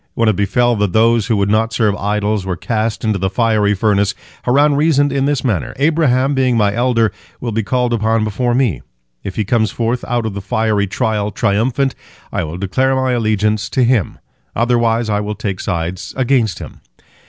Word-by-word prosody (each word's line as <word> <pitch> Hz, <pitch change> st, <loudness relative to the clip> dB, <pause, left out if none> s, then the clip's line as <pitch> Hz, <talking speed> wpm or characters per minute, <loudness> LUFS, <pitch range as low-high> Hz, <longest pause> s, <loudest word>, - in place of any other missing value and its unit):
When 115 Hz, -, +1 dB
it 110 Hz, -, +3 dB
befell 120 Hz, +5 st, +1 dB
that 100 Hz, -3 st, 0 dB
those 115 Hz, -1 st, +3 dB
who 115 Hz, -3 st, +1 dB
would 100 Hz, 0 st, +1 dB
not 110 Hz, +1 st, +1 dB
serve 105 Hz, -4 st, +1 dB
idols 105 Hz, 0 st, -1 dB
were 95 Hz, -1 st, -3 dB
cast 110 Hz, +3 st, -2 dB
into 110 Hz, -3 st, 0 dB
the 95 Hz, +1 st, 0 dB
fiery 105 Hz, -1 st, +1 dB
furnace, 100 Hz, 0 st, +1 dB, 0.3 s
Haran 145 Hz, +4 st, +3 dB
reasoned 145 Hz, -2 st, +2 dB
in 135 Hz, -1 st, +1 dB
this 145 Hz, -1 st, 0 dB
manner: 105 Hz, -, -1 dB
"Abraham, 140 Hz, -3 st, +2 dB
being 130 Hz, -3 st, +1 dB
my 105 Hz, -2 st, +2 dB
elder, 115 Hz, -2 st, +1 dB, 0.3 s
will 120 Hz, -, -3 dB
be 110 Hz, +1 st, 0 dB
called 125 Hz, +2 st, 0 dB
upon 110 Hz, 0 st, +1 dB
before 120 Hz, +3 st, -1 dB
me. 120 Hz, -, +1 dB, 0.4 s
If 95 Hz, -, -6 dB
he 110 Hz, -, -1 dB
comes 110 Hz, -1 st, +1 dB
forth 120 Hz, +1 st, -2 dB
out 120 Hz, -2 st, -1 dB
of 110 Hz, -, -3 dB
the 100 Hz, -, -5 dB
fiery 105 Hz, +1 st, 0 dB
trial 105 Hz, +1 st, -1 dB
triumphant, 120 Hz, +7 st, 0 dB, 0.4 s
I -, -, -1 dB
will 80 Hz, +2 st, -5 dB
declare 130 Hz, +8 st, 0 dB
my 130 Hz, -1 st, 0 dB
allegiance 110 Hz, -3 st, 0 dB
to 130 Hz, -, +1 dB
him; 120 Hz, -6 st, +1 dB, 0.4 s
otherwise 115 Hz, -1 st, +1 dB
I 105 Hz, -1 st, 0 dB
will 105 Hz, 0 st, -3 dB
take 100 Hz, -3 st, -4 dB
sides 85 Hz, +1 st, -4 dB
against 125 Hz, -6 st, +1 dB
him." -, -, -10 dB
110 Hz, 190 wpm, -17 LUFS, 105-125 Hz, 0.4 s, it